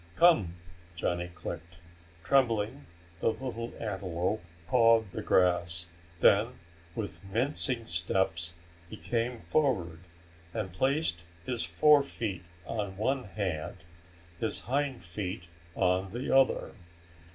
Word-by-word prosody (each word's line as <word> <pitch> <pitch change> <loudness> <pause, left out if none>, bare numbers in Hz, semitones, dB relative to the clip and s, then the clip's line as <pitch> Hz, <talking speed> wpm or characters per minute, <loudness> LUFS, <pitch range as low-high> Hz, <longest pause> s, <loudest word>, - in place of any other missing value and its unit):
"Come," 120 - +5 0.4
Johnny 85 +1 -1
clicked. 85 -1 -7 0.5
Trembling, 120 -1 +2 0.3
the 110 - +2
little 120 -2 -5
antelope 95 -1 -2 0.3
pawed 115 -4 +5
the - - -4
grass. 85 -2 +2 0.4
Then 110 +5 +5 0.4
with 100 -2 -5
mincing 120 +3 0
steps 85 -1 0 0.3
he 110 - -8
came 120 +1 -2
forward 90 - +1 0.6
and 95 -5 -3
placed 130 - +1 0.2
his 120 -3 -1
forefeet 140 - +3 0.2
on 100 -2 -3
one 130 +5 0
hand, 95 -7 -4 0.6
his 115 - -2
hind 135 -1 -1
feet 90 +1 -4 0.3
on 95 +1 +1
the 125 +2 0
other. 135 -1 +4
105 Hz, 105 wpm, -30 LUFS, 90-125 Hz, 0.6 s, Come